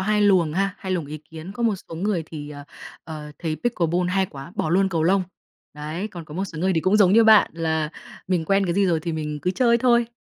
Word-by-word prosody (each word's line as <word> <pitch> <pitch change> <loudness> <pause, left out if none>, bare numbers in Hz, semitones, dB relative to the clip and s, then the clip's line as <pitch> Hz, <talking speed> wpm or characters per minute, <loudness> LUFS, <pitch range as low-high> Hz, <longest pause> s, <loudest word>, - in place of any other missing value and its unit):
hai 210 +2 +1
luồng 185 -6 +4
ha, 195 +2 0
hai 190 -1 -4
luồng 170 -5 -2
ý 155 +1 -7
kiến. 160 +4 -10
Có 235 - -5
một 225 -3 +2
số - - -7
người 185 0 -1
thì, 150 -2 -8
ờ, 145 -1 -9 0.4
ờ, 150 -2 -8
thấy 160 -3 -3
pickleball 180 -6 0
hay 190 0 +1
quá, 145 +3 -10
bỏ 155 - -1
luôn 190 +2 +3
cầu 165 -4 -1
lông. 190 +3 +3 0.5
Đấy. 155 +7 -5
Còn 175 -5 -9
có 150 - -11
một 190 - -1
số 165 -5 -8
người 190 +3 +1
thì 160 - +2
cũng 185 +5 +3
giống 195 -3 +5
như 225 +1 +6
bạn 220 -2 +6
là 160 -2 -1 0.4
mình 180 -3 +1
quen 195 +3 +2
cái 170 - -1
gì 200 0 +3
rồi 165 -3 +1
thì 165 +1 -3
mình 150 -1 -4
cứ 180 - +1
chơi 235 +4 +3
thôi. 235 -1 +3
180 Hz, 260 wpm, -23 LUFS, 160-195 Hz, 0.5 s, như